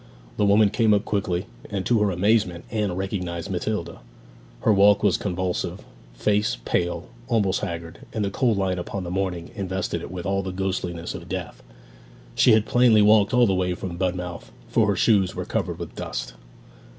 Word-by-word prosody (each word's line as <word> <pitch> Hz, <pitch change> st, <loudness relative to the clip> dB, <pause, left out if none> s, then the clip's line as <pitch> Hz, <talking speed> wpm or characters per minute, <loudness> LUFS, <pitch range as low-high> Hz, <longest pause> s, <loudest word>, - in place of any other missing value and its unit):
The 105 Hz, -, +2 dB
woman 100 Hz, 0 st, +5 dB
came 110 Hz, -1 st, +3 dB
up 100 Hz, +1 st, -1 dB
quickly, 95 Hz, -3 st, -1 dB, 0.2 s
and, 100 Hz, -2 st, -3 dB
to 120 Hz, -2 st, +3 dB
her 105 Hz, -, +3 dB
amazement, 95 Hz, -1 st, +1 dB
Anne 105 Hz, -5 st, -1 dB
recognized 90 Hz, -2 st, -3 dB
Matilda. 90 Hz, -2 st, -3 dB, 0.6 s
Her 110 Hz, -, +4 dB
walk 100 Hz, +1 st, +5 dB
was 100 Hz, -4 st, +4 dB
convulsive, 90 Hz, -2 st, -2 dB, 0.3 s
face 105 Hz, -, +1 dB
pale, 85 Hz, 0 st, -1 dB, 0.2 s
almost 105 Hz, -6 st, +1 dB
haggard, 85 Hz, -4 st, -5 dB
and 105 Hz, -2 st, -1 dB
the 100 Hz, -, -2 dB
cold 115 Hz, -1 st, +1 dB
light 95 Hz, -2 st, 0 dB
of 90 Hz, -, -6 dB, 0.2 s
the 85 Hz, -, -5 dB
morning 90 Hz, -3 st, -2 dB
invested 95 Hz, -4 st, -3 dB
it -, -, -7 dB
with 90 Hz, 0 st, -6 dB
all 95 Hz, 0 st, 0 dB
the 95 Hz, 0 st, -4 dB
ghostliness 90 Hz, -2 st, -3 dB
of -, -, -9 dB
death. -, -, -5 dB, 0.7 s
She 120 Hz, -, +5 dB
had 110 Hz, -1 st, +4 dB
plainly 120 Hz, -4 st, +5 dB
walked 105 Hz, -1 st, +5 dB
all 125 Hz, -1 st, +5 dB
the 95 Hz, -, +2 dB
way 90 Hz, -1 st, 0 dB
from 90 Hz, -1 st, -6 dB
Budmouth, 90 Hz, -6 st, -3 dB, 0.2 s
for 110 Hz, -, +3 dB
her 100 Hz, -, +2 dB
shoes 100 Hz, -2 st, +3 dB
were -, -, -4 dB
covered -, -, -2 dB
with -, -, -7 dB
dust. -, -, -5 dB
95 Hz, 180 wpm, -24 LUFS, 90-105 Hz, 0.7 s, woman